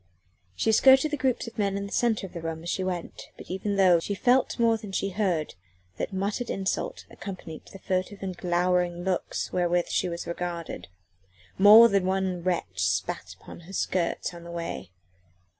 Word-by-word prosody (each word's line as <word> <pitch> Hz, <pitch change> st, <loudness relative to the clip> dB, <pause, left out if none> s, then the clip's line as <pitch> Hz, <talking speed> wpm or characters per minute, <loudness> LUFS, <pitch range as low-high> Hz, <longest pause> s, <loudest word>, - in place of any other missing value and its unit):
She 220 Hz, -, +1 dB
skirted 265 Hz, +6 st, +6 dB
the -, -, +1 dB
groups 260 Hz, -3 st, 0 dB
of 230 Hz, -1 st, -9 dB
men 200 Hz, -1 st, +1 dB
in 200 Hz, -, -3 dB
the 200 Hz, -, -9 dB
centre 225 Hz, -4 st, +1 dB
of 190 Hz, -, -11 dB
the 170 Hz, -, -6 dB
room 165 Hz, 0 st, -5 dB
as 175 Hz, -, -3 dB
she 190 Hz, -, -1 dB
went, 180 Hz, -2 st, -5 dB
but -, -, -10 dB
even 200 Hz, +2 st, -2 dB
so 185 Hz, -3 st, +5 dB
she 200 Hz, +4 st, -3 dB
felt 250 Hz, +5 st, +2 dB
more 230 Hz, -1 st, +3 dB
than 215 Hz, -3 st, -8 dB
she 195 Hz, +1 st, -1 dB
heard 180 Hz, -6 st, -1 dB, 0.4 s
that -, -, -3 dB
muttered 200 Hz, +5 st, -2 dB
insults 190 Hz, -1 st, -2 dB
accompanied 180 Hz, -5 st, -8 dB
the -, -, -11 dB
furtive 190 Hz, +1 st, -3 dB
and 185 Hz, -1 st, -4 dB
glowering 175 Hz, 0 st, 0 dB
looks 185 Hz, -1 st, -2 dB
wherewith 175 Hz, -1 st, +1 dB
she 180 Hz, -, 0 dB
was 170 Hz, 0 st, -5 dB
regarded. 170 Hz, -, -5 dB, 0.7 s
More 215 Hz, +4 st, +10 dB
than 195 Hz, -4 st, +1 dB
one 190 Hz, -2 st, -1 dB
wretch 170 Hz, -, -2 dB
spat 90 Hz, -1 st, -1 dB
upon -, -, -11 dB
her -, -, -9 dB
skirts 180 Hz, -2 st, -1 dB
on 170 Hz, -1 st, -10 dB
the 170 Hz, -, -10 dB
way. 170 Hz, -, -5 dB
185 Hz, 185 wpm, -27 LUFS, 175-205 Hz, 0.7 s, More